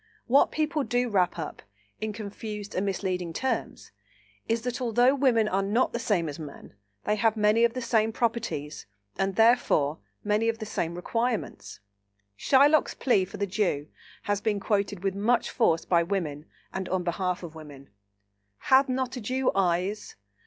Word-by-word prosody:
What 270 +4 +4
people 310 -1 0
do 245 -1 0
wrap 185 -5 +1
up, 165 - -6 0.4
in 215 +1 -3
confused 210 0 -7
and 185 - -1
misleading 180 -3 -2
terms, 265 +9 -3 0.6
is, 225 0 0
that 250 +1 -3
although 245 +2 +3
women 255 -6 +3
are 195 -1 +1
not 210 +6 +1
the 235 - -2
same 200 -8 0
as 145 0 -6
men, 150 -8 -10 0.3
they 210 - +1
have 220 +1 +2
many 210 +2 +3
of 235 +1 +2
the 255 - -3
same 225 -2 +2
properties 220 - -3 0.3
and 195 0 0
therefore 225 -11 +3 0.2
many 215 +2 +1
of 225 - -1
the 220 - -6
same 170 -5 -3
requirements. 220 - -3 0.5
Shylock's 285 - +4
plea 205 -8 +2
for 190 - -10
the 200 - 0
Jew 180 -7 -1 0.3
has 205 0 -1
been 210 -2 0
quoted 200 -2 -1
with 195 -1 0
much 220 +5 +1
force 165 -9 +2
by 170 -2 +3
women 165 -5 -3 0.3
and 190 -1 -4
on 185 -1 0
behalf 180 +1 -2
of 165 -2 -8
women: 145 -5 -12 0.7
"Hath 265 - +4
not 255 0 -1
a - - -5
Jew 255 +4 0
eyes? 190 +2 -1
210 Hz, 165 wpm, -27 LUFS, 180-235 Hz, 0.7 s, What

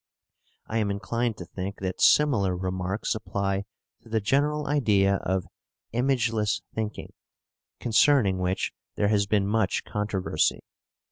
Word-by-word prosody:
I 115 - -1
am 105 -2 0
inclined 115 +3 -2
to 90 - -7
think 95 +3 -6
that 95 -1 -3
similar 105 -12 +4
remarks 95 +2 -2
apply 100 -2 -2 0.4
to 115 - -17
the 110 0 +1
general 145 +7 +1
idea 100 -9 +3
of 95 -1 -1 0.5
"imageless 115 -4 +1
thinking," 110 -1 -4 0.7
concerning 115 -4 +3
which 90 +1 -1 0.2
there 105 - +1
has 100 -1 +2
been 100 -1 +2
much 105 -1 +1
controversy. 105 -2 -1
105 Hz, 125 wpm, -26 LUFS, 95-115 Hz, 0.7 s, similar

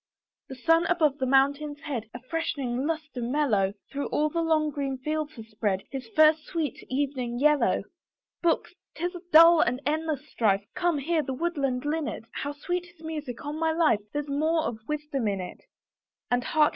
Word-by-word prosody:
The 265 - -6
sun 330 +6 +3
above 315 -6 +2
the 260 - 0
mountain's 285 +3 +2
head, 240 -8 -4
A 245 - -8
freshening 270 -3 -2
lustre 310 -5 -3
mellow, 235 -7 +1 0.2
Through 280 0 -2
all 305 +1 +1
the 335 +2 -1
long 310 -2 +2
green 275 -2 -2
fields 305 +3 -3
has 225 - -9
spread, 205 -3 -1
His 265 -3 -5
first 310 0 +6
sweet 320 -4 -3
evening 260 -3 -1
yellow. 300 +2 +3 0.6
Books! 340 -1 +1 0.2
'tis 350 +3 -2
a 355 - -8
dull 330 +1 +8
and 250 +2 +1
endless 305 -1 -1
strife, 200 -6 +1
Come, 350 -3 +1
hear 315 +3 +1
the 265 -2 -4
woodland 275 -5 -1
linnet, 300 -4 -2
How 285 - -3
sweet 355 +5 -3
his 350 -2 -19
music; 300 -7 -5
on 295 +2 -4
my 325 0 +2
life 320 -9 +3
There's 295 0 -3
more 310 +3 +1
of 225 -7 -3
wisdom 295 -5 -2
in 200 -2 0
it. 180 - -7 0.7
And 245 0 +1
hark! 305 -1 +4
295 Hz, 180 wpm, -27 LUFS, 255-315 Hz, 0.7 s, dull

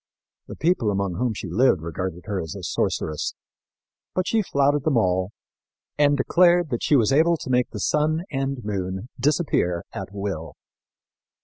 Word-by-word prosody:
The - - -8
people 160 -10 +1
among 100 -2 -1
whom 125 -3 0
she 100 - -5
lived 95 -2 +2
regarded 90 +2 -4
her 100 -3 -2
as 80 - -6
a - - -8
sorceress; 75 -1 -2 0.8
but 185 0 0
she 225 - +2
flouted 140 -5 +1
them 145 -5 +2
all, 95 -3 +1 0.7
and 145 -1 +3
declared 175 +2 +3
that 120 - -1
she 150 - +3
was 125 0 +3
able 165 +4 +4
to 130 - -6
make 125 -1 +2
the 105 - -7
sun 155 - +1
and 135 -2 -2
moon 95 +1 -3
disappear 125 - +1
at - - -6
will. 100 -6 -5
125 Hz, 165 wpm, -24 LUFS, 95-150 Hz, 0.8 s, able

